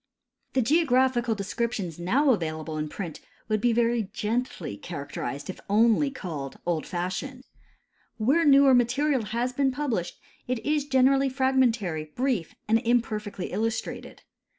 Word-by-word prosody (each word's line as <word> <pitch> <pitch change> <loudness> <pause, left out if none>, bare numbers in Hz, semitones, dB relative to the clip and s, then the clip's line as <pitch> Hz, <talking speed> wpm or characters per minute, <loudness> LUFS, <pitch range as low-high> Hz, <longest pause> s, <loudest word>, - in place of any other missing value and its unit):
The 260 - +2
geographical 255 -5 +2
descriptions 200 -4 -3
now 255 +11 +3
accessible 155 -4 -3
in 150 0 -3
j)rint 170 -2 -6 0.3
Avould 215 -1 +1
be 245 - +3
very 230 -3 +1
gently 215 - -2
characterized 140 - -6
if 190 - -6
only 230 +6 +4
called 160 - -6
"old 170 -3 -1
fashioned." 185 +10 -4 0.7
Where 270 +10 +3
newer 275 -2 +6
material 255 +1 +2
has 235 +4 -2
been 275 +1 +2
pub 290 +1 -2
lished, 175 -6 -2 0.3
it 255 0 0
is 295 -1 +1
generally 270 0 +4
fragmentary, 245 - +1
brief, 250 -9 -1
and 225 +1 +4
imperfectly 220 -5 -1
illus 225 +1 0
trated. - - -9
230 Hz, 135 wpm, -26 LUFS, 185-260 Hz, 0.7 s, newer